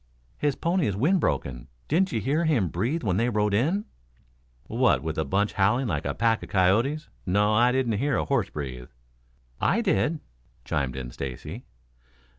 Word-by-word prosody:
"His 145 -2 +1
pony 170 -2 0
is 100 - -1
wind 160 - +2
broken. 60 - -2 0.2
Didn't 185 +6 +2
you 115 - 0
hear 150 - +1
him 120 - +2
breathe 120 - -1
when 95 -4 +1
they 115 +3 +2
rode 105 -2 +1
in?" 160 - +1 0.8
"What, - - +2
with - - -3
the - - 0
bunch 100 +8 0
howling 105 +7 +2
like 115 - -2
a - - -2
pack 115 -1 +2
of - - -9
coyotes? 115 +12 +2 0.2
No, 105 +2 +2
I 120 +3 +4
didn't 125 -5 0
hear 140 -1 +1
a - - 0
horse 135 -8 0
breathe." 65 -4 -6 0.7
"I 215 +6 +2
did," 165 -7 +1 0.5
chimed 65 -2 -1
in 65 -2 -6
Stacy. 65 0 -7
115 Hz, 175 wpm, -26 LUFS, 95-145 Hz, 0.8 s, I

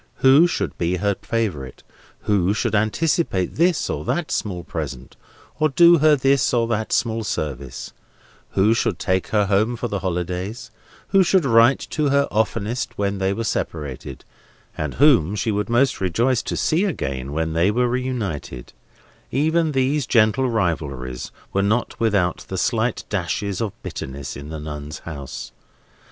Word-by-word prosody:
Who 140 +6 +7
should 175 - -2
be 85 +1 +1
her 100 +3 +1
favourite, 90 - -3 0.4
who 100 -1 +1
should - - -1
anticipate 110 - +1
this 170 +1 +2
or - - -3
that 175 -3 -1
small 90 -5 -2
present, 70 -6 -6 0.4
or 155 0 +3
do 170 +4 +6
her 155 0 +5
this 135 -1 +2
or 115 -1 +2
that 110 -1 -1
small 115 -1 0
service; 75 - -4 0.6
who 105 +4 +4
should 115 - 0
take 95 -1 0
her 105 -2 +2
home 105 +5 +1
for 120 +1 -3
the 100 -3 -3
holidays; 90 +4 -4 0.4
who 195 - +5
should 185 -2 +3
write 115 +1 +5
to 150 - 0
her 140 +1 +4
the 140 - -3
oftenest 110 +2 -1
when 100 -1 -1
they 95 0 +1
were 115 +3 -2
separated, 75 - -4 0.5
and 75 -3 -4
whom 120 - +4
she 105 +2 -1
would 105 +1 -2
most 120 0 +2
rejoice 115 +7 +1
to - - -4
see 165 +5 +1
again 70 - -3
when 80 +1 -1
they 85 +4 +3
were 120 +4 +2
reunited; 120 - -4 0.6
even 160 +3 +1
these 135 0 +1
gentle 115 +3 +3
rivalries 75 - -2 0.2
were 100 - +2
not 110 +5 0
without 100 -6 +1
their - - -3
slight - - 0
dashes 100 -1 -2
of 110 -3 -1
bitterness 65 -1 -6
in 75 +1 -8
the 80 -1 -6
Nuns' 75 0 -6
House. 70 -4 -7
105 Hz, 160 wpm, -22 LUFS, 85-130 Hz, 0.6 s, Who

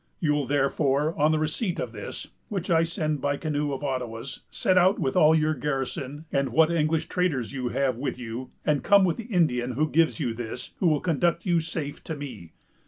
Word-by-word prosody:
You'll 150 -4 +1
therefore, 140 +2 +1
on 150 +2 +3
the 155 - +2
receipt 155 +5 -1
of 120 - -3
this, 105 -3 -7 0.2
which 190 -3 -3
I 165 -1 +5
send 155 -4 -1
by 145 0 +1
a - - -7
canoe 150 -2 -1
of 135 +1 -4
Ottawas, 125 -3 -4
set 185 - +1
out 185 +2 +5
with 135 -6 -1
all 155 +1 +6
your 155 0 +2
garrison, 140 +1 -3
and 140 0 +1
what 160 +1 +4
English 160 -1 +1
traders 145 -10 -1
you 130 -2 -2
have 130 -1 0
with 135 +1 -3
you, 120 +1 -6 0.2
and 150 -2 +1
come 200 -1 +6
with 170 -3 0
the 230 - -6
Indian 140 - +1
who 155 +6 +1
gives 165 +2 +2
you 125 -7 -1
this, 120 +1 -6
who 185 - +2
will 155 -3 +2
conduct 170 0 +1
you 175 -3 +3
safe 160 -3 -5
to 160 - -4
me. 120 - -8
150 Hz, 210 wpm, -26 LUFS, 135-165 Hz, 0.2 s, all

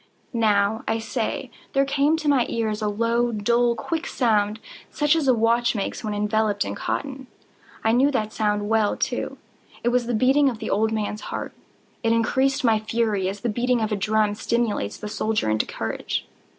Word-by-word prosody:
—now, 220 0 +2
I 225 - +1
say, 230 +2 -3 0.2
there 275 0 +3
came 290 +3 +2
to 310 -2 -4
my 270 -5 +3
ears 220 -2 -1
a 210 - 0
low, 230 +3 +1
dull, 235 +3 +2
quick 325 +8 -3
sound, 215 -3 +1 0.3
such 295 +1 +2
as 315 -4 0
a 260 - +6
watch 235 +1 +2
makes 200 - -3
when 210 -1 -2
enveloped 210 0 +1
in - - -3
cotton. 270 -2 -4 0.6
I 220 - +3
knew 255 +5 +4
that 215 -6 -1
sound 210 -1 0
well, 220 -1 +2
too. - - -2 0.5
It 240 - +3
was 245 -1 +1
the 240 - 0
beating 270 +5 +4
of 240 - -5
the - - -4
old 220 +2 +2
man's 215 -1 -2
heart. - - -5 0.5
It 230 -1 +2
increased 265 +4 +1
my 225 -3 +4
fury, 215 -3 0
as 195 +1 -6
the 240 - -1
beating 245 +3 +1
of 220 -1 -1
a - - +2
drum 210 +1 +1
stimulates 220 - -1
the 210 - -6
soldier 215 - 0
into 110 - 0
courage. - - -3
225 Hz, 190 wpm, -24 LUFS, 210-245 Hz, 0.6 s, a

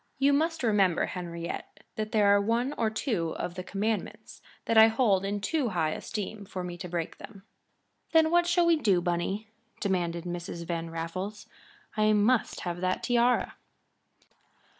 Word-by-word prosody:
You 275 +1 +3
must 320 +1 0
remember, 200 -6 +3
Henriette, 170 -2 -6
that 215 0 -3
there 210 -2 +3
are 200 0 +5
one 235 +6 0
or 225 - +1
two 215 - -2
of 175 - -4
the 185 - -5
commandments 210 +3 -3 0.2
that 230 - 0
I 220 0 +9
hold 220 -4 +2
in 200 +1 -2
too 285 +2 0
high 165 -5 0
esteem 205 +2 -5
to 180 -1 -6
break 170 -1 -4
them." 200 -3 -12 0.7
"Then 320 -1 +4
what 345 0 +4
shall 350 0 +3
we 335 -1 +4
do, 200 -11 +3
Bunny?" 175 +5 -2 0.3
demanded 175 -4 -1
Mrs. 175 -1 -5
Van 165 -1 -3
Raffles. 185 +6 -5 0.5
"_I 215 0 +3
must 220 +3 +2
have 175 -1 -4
that 185 0 -1
tiara. 245 0 +2
200 Hz, 155 wpm, -28 LUFS, 175-230 Hz, 0.7 s, I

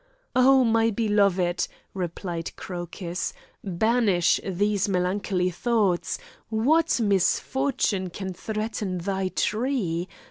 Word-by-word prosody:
"Oh, 260 +1 +6
my 225 -1 +3
beloved," 200 -5 +2 0.3
replied 175 -2 -4
Crocus, 175 0 -5 0.3
"banish 200 -1 +2
these 200 +1 0
melancholy 185 0 0
thoughts! 205 -2 +1 0.3
What 290 +8 +2
misfortune 205 0 +1
can 190 +1 -5
threaten 215 -1 -3
thy 190 +2 -1
tree? 210 -5 -1
200 Hz, 85 wpm, -25 LUFS, 180-225 Hz, 0.3 s, Oh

